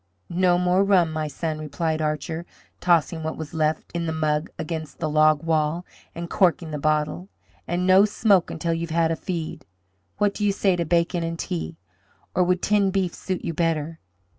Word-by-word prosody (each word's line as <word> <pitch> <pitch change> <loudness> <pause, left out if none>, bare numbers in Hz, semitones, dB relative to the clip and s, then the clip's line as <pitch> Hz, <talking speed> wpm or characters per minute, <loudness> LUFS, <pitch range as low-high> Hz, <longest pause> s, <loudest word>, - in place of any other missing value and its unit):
"No 175 0 +3
more 180 +2 +3
rum, 185 -5 +3
my 155 -1 -2
son," 155 +1 -3
replied 155 +1 -2
Archer, 155 +2 -2 0.3
tossing 170 -2 +2
what 160 0 -4
was 160 -1 -7
left 155 -1 -1
in 170 -1 -2
the - - 0
mug 155 0 0
against 160 -1 -5
the 160 - -2
log 155 0 +4
wall, 160 +1 0 0.3
and 170 0 -5
corking 170 -3 +2
the 150 - -3
bottle, 155 +5 0 0.4
"and 175 +1 -1
no 190 +2 +7
smoke 205 -3 +3
until 170 -1 -2
you 165 +1 -2
have 160 - -5
had 165 -1 +3
a - - +1
feed. 165 -1 -5 0.5
What 205 -1 +2
do 210 - -4
you 205 -1 +3
say 195 -2 +2
to 170 -1 -1
bacon 170 +1 +1
and 165 0 -3
tea! 80 - -4 0.6
Or 180 - +3
would 180 0 +1
tinned 200 -2 +2
beef 190 -3 0
suit 185 -1 -4
you 165 - -2
better?" 160 -1 -1
165 Hz, 190 wpm, -24 LUFS, 155-180 Hz, 0.6 s, no